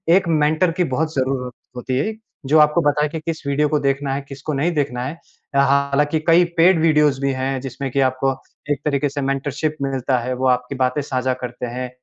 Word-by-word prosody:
एक 190 -1 +2
मेंटर 155 +2 +2
की - - +5
बहुत 155 +4 -1
ज़रूरत 130 -2 -1 0.2
होती 125 +1 -3
है 215 +11 -1 0.3
जो 155 +3 +5
आपको 150 +3 +4
बताए 150 +1 0
कि 160 - -5
किस 160 -1 -5
वीडियो 145 +1 +1
को 150 - +1
देखना 140 0 0
है, 140 - -2
किसको 140 +2 -6
नहीं 145 +5 +1
देखना 135 -4 -1
है। 140 - -4 0.4
अ, - - +4
हालाँकि 140 +2 +2
कई 170 +1 +6
पेड 170 +1 +5
वीडियोज़ 150 -4 +3
भी 140 0 +1
हैं 130 +1 -2
जिसमें 135 +1 -5
कि 140 - 0
आपको 130 +1 -1 0.4
एक 145 - -1
तरीके 145 -1 +1
से 145 +1 -4
मेंटरशिप 140 +3 -2
मिलता 135 -2 0
है 125 +2 -3
वो 130 +1 0
आपकी 125 +2 0
बातें 130 +2 0
साझा 130 -2 -1
करते 125 0 -5
हैं, 125 +1 -5
140 Hz, 210 wpm, -20 LUFS, 130-150 Hz, 0.4 s, कई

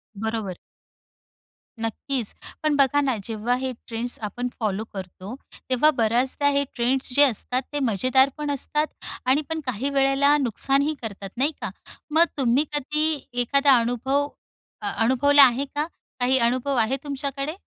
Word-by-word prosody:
बरोबर. 220 -3 -3 1.2
नक्कीच. 225 +1 -3 0.3
पण 305 -1 +2
बघा 285 +1 +3
ना 265 -4 +1
जेव्हा 225 +3 -1
हे 260 0 -2 0.2
ट्रेंड्स 235 +1 -2
आपण 240 +4 -3
फॉलो 215 -1 -1
करतो 190 +4 -7 0.3
तेव्हा 260 +4 +4
बऱ्याचदा 250 +5 +2
हे 280 - +3
ट्रेंड्स 255 +2 0
जे 290 - +7
असतात 250 0 +1
ते 290 - -1
मजेदारपण 265 +7 +2
असतात 300 +2 -1 0.4
आणि 265 +4 +3
पण 320 0 -2
काही 255 +2 -2
वेळेला 275 +1 +3
नुकसानही 275 +3 +2
करतात 200 -3 -6
नाही 280 +5 +2
का? 225 - -3 0.4
मग 325 +3 +5
तुम्ही 265 +2 +2
कधी 300 +1 -1 0.2
एखादा 275 +2 +4
अनुभव 260 +5 0 0.5
अ 205 - -1
अनुभवला 285 +4 +6
आहे 260 +1 +3
का, 300 +1 0 0.3
काही 255 +1 +3
अनुभव 255 +3 +1
आहे 230 +3 +2
तुमच्याकडे? 280 +1 -3
260 Hz, 140 wpm, -24 LUFS, 235-285 Hz, 1.2 s, जे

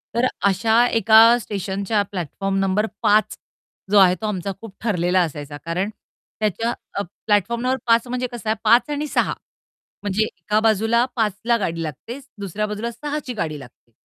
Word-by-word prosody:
तर 235 +2 +2 0.2
अशा 225 +5 +3
एका 225 -2 +5 0.2
स्टेशनच्या 200 +1 -2
प्लॅटफॉर्म 195 +2 -3
नंबर 195 +2 +1 0.2
5 210 +1 +3 0.5
जो 210 - +5
आहे 185 -2 +6
तो - - -3
आमचा 195 -2 -3
खूप 225 -4 -10
ठरलेला 180 -4 +2
असायचा. 145 -3 -4
कारण 180 +4 -1 0.5
त्याच्या 220 +2 0 0.2
अ, 200 - -1 0.2
प्लॅटफॉर्म 220 +3 +1
नंबर 255 +1 +1
5 230 +1 +3
म्हणजे 250 +1 -2
कसं 235 -2 -5
आहे 220 - +2
5 235 +6 +4
आणि 295 +1 -2
6 - - +1 0.7
म्हणजे 205 +1 +1
एका 215 0 -1
बाजूला 225 +2 +2
5 220 -4 +1
ला 235 0 +4
गाडी 165 -6 -2
लागते 165 - -7 0.2
दुसऱ्या 200 +1 -3
बाजूला 210 +3 -4
6 290 +6 -4
ची 250 - -3
गाडी 155 -9 -3
लागते 125 -2 -16
210 Hz, 165 wpm, -21 LUFS, 190-230 Hz, 0.7 s, आहे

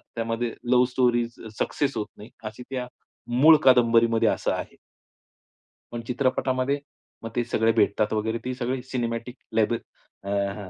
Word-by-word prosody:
त्यामध्ये 115 0 -2 0.2
लव 125 0 +6
story 120 -2 +2 0.3
success 140 -5 -1
होत 105 - -2
नाही 105 - -11 0.2
अशी 110 +3 -7
त्या 125 -2 -3 0.5
मूळ 160 +2 +9
कादंबरीमध्ये 115 -2 +5
असं - - 0
आहे. - - -6 1.2
पण 120 - -4
चित्रपटामध्ये 130 +1 0 0.4
मग 115 - -4
ते 120 - +1
सगळे 115 +1 +2
भेटतात 110 -1 +2
वगैरे 110 +1 -1
ती 130 - -2
सगळी 125 +1 -2
सिनेमॅटिक 120 -1 -3 0.2
लेबल 110 +1 +2 0.5
अ, 100 - -6
हं, 100 0 -2
120 Hz, 140 wpm, -25 LUFS, 110-125 Hz, 1.2 s, मूळ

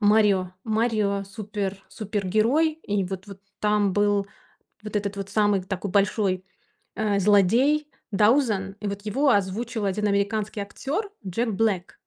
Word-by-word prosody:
"Марио". 205 -3 +3
"Марио 215 -3 0
супер 200 -1 -5
супергерой". 215 - +1
И 205 -1 0
вот 190 +1 -6
вот 200 -1 -11 0.2
там 210 -2 +2
был 205 0 +2 0.6
вот 210 0 -4
этот 200 -1 -2
вот 195 0 -5
самый 205 -2 +2
такой 190 +1 -4
большой, 195 -1 +1 0.5
а, 210 -2 +1
злодей 225 +10 +3 0.2
Даузен. 210 -2 +2
И 210 - -4
вот 200 0 -5
его 270 +8 +1
озвучил 210 +2 0
один 200 +2 0
американский 205 +1 0
актёр- 290 - -3 0.2
Джек 230 +6 -1
Блэк. 200 -4 0
205 Hz, 135 wpm, -25 LUFS, 195-220 Hz, 0.6 s, Марио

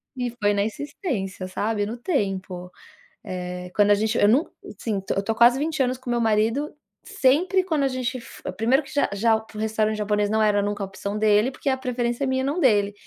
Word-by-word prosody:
e 250 -1 -2
foi 205 0 +3
na 200 - +1
insistência, 220 - -4
sabe, 205 +2 -1
no 230 +3 -5
tempo, 195 - -2 0.5
eh, 180 0 -5
quando 205 0 +4
a - - +7
gente 220 +2 0
eu 205 - +5
num 260 +9 +4 0.3
assim, 210 -4 -2
tô 190 - -3
eu 195 - 0
tô 225 - 0
há - - -4
quase 240 +3 +5
20 310 0 0
anos 255 0 0
com 255 -1 -6
meu 240 0 +1
marido, 225 +6 +1 0.3
sempre 360 +9 +2
quando 315 -6 0
a - - +3
gente 255 0 -3
f 235 - -13
primeiro 255 +6 +2
que 275 - -13
já 285 - +2
já 220 +2 +2
p 220 0 -15
o - - -4
restaurante 220 0 0
japonês 210 -1 0
não 220 +1 +1
era 210 -1 +3
nunca 205 0 -2
a - - -4
opção 200 +2 -5
dele, 215 +3 +3
porque 270 +1 -2
a 265 - 0
preferência 245 0 -2
é - - 0
minha, 260 0 0
não 290 +6 -1
dele. 205 -7 +3
220 Hz, 230 wpm, -24 LUFS, 205-260 Hz, 0.5 s, a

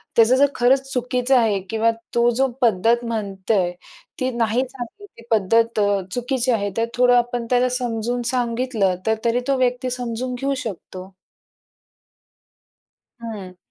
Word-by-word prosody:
त्याचं 230 +2 +5
जर 280 +2 +5
खरंच 270 +2 +2
चुकीचं 250 +1 +1
आहे 215 -4 +2
किंवा 225 +1 +2 0.2
तो 235 0 +4
जो 270 +1 +3
पद्धत 230 +2 +3
म्हणतोय, 200 -4 -1 0.5
ती 255 0 0
नाही 230 +2 +1
चांगली 265 - -9
ती 230 - -13
पद्धत 225 +2 +2 0.3
चुकीची 250 0 0
आहे, 205 -3 0
तर 230 - +2
थोडं 245 0 +5
आपण 240 0 0
त्याला 250 0 +3
समजून 240 0 -2
सांगितलं 235 -5 0
तर 220 - +3
तरी 235 +1 +2
तो 275 -1 +2
व्यक्ती 255 0 0
समजून 250 0 -3
घेऊ 275 +1 0
शकतो. 185 -2 -7 2.1
हं. 200 -5 -7
235 Hz, 135 wpm, -21 LUFS, 220-250 Hz, 2.1 s, त्याचं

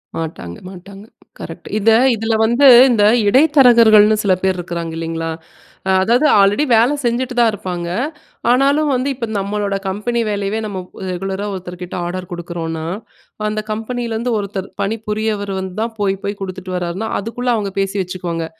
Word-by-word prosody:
மாட்டாங்க, 155 - -6
மாட்டாங்க. 195 +2 -12 0.3
கரெக்ட்டு. - - -9
இத 215 +2 +3 0.3
இதுல 225 +1 -1
வந்து 240 +5 +4 0.2
இந்த 220 -4 +3 0.3
இடைத்தரகர்கள்னு 235 -6 +6
சில 195 -2 +3
பேர் 190 -1 +1
இருக்குறாங்க 170 -2 -5
இல்லேங்களா? 165 0 -3 0.7
அதாவது 240 +8 +2
ஆல்ரெடி 205 +7 +4
வேல 230 +5 +4
செஞ்சுட்டு 250 +1 -1
தான் 235 -1 +5
இருப்பாங்க. 180 -4 -5 0.6
ஆனாலும் 280 +4 +3
வந்து 255 +2 0
இப்ப 250 -2 -4
நம்மளோட 200 0 -2
கம்பெனி 215 +5 -1
வேலையவே 205 +1 -2
நம்ம 200 -3 -5 0.3
ரெகுலரா 190 +2 -3
ஒருத்தர்கிட்ட 180 -1 -7
ஆர்டர் 180 +1 -5
குடுக்கிறோன்னா 170 -2 -5 0.6
அந்த 215 0 -2
கம்பெனில 230 +2 -3
இருந்து 235 +3 -2
ஒருத்தர் 200 -2 -4
பணிபுரியவர் 210 -1 -2
வந்து 190 -1 -5
தான் 230 0 -2
போய் 195 -1 +1
போய் 200 0 -3
குடுத்துட்டு 185 -1 -6
வர்றார்னா, 180 +4 -3
அதுக்குள்ள 240 +4 -4
அவங்க 205 -3 -3
பேசி 195 +1 -1
வச்சுக்குவாங்க. 175 -2 -4
205 Hz, 140 wpm, -18 LUFS, 185-230 Hz, 0.7 s, இடைத்தரகர்கள்னு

